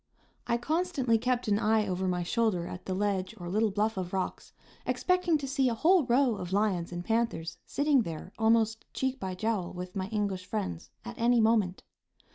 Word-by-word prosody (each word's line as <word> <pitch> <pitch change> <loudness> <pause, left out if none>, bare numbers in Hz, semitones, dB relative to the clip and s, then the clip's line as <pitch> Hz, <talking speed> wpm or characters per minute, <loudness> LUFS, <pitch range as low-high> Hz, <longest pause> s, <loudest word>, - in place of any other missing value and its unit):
I 235 - +2
constantly 275 -4 +1
kept 250 0 0
an 205 0 +2
eye 215 0 +3
over 185 0 -1
my 180 -1 0
shoulder 205 -3 +1
at 180 - -8
the 185 - -1
ledge 195 +1 -1
or 175 -3 -7
little 215 +5 +2
bluff 210 +2 0
of 180 -1 -4
rocks, 190 -1 -3 0.3
expecting 365 -3 +2
to 285 -2 -5
see 270 -1 +2
a 230 - -1
whole 330 +5 +4
row 245 -2 +3
of 180 -1 -6
lions 195 -4 +1
and 175 0 -5
panthers 225 -8 -1
sitting 285 -2 +3
there, 170 -1 -6
almost 225 0 +3
"cheek 265 0 -1
by 190 -1 -4
jowl" 210 -3 -1
with 180 0 -7
my 190 -1 -2
English 200 -3 -2
friends, 195 - -4 0.2
at 110 - -8
any 240 +1 +4
moment. 220 -5 +2
215 Hz, 190 wpm, -29 LUFS, 185-240 Hz, 0.3 s, whole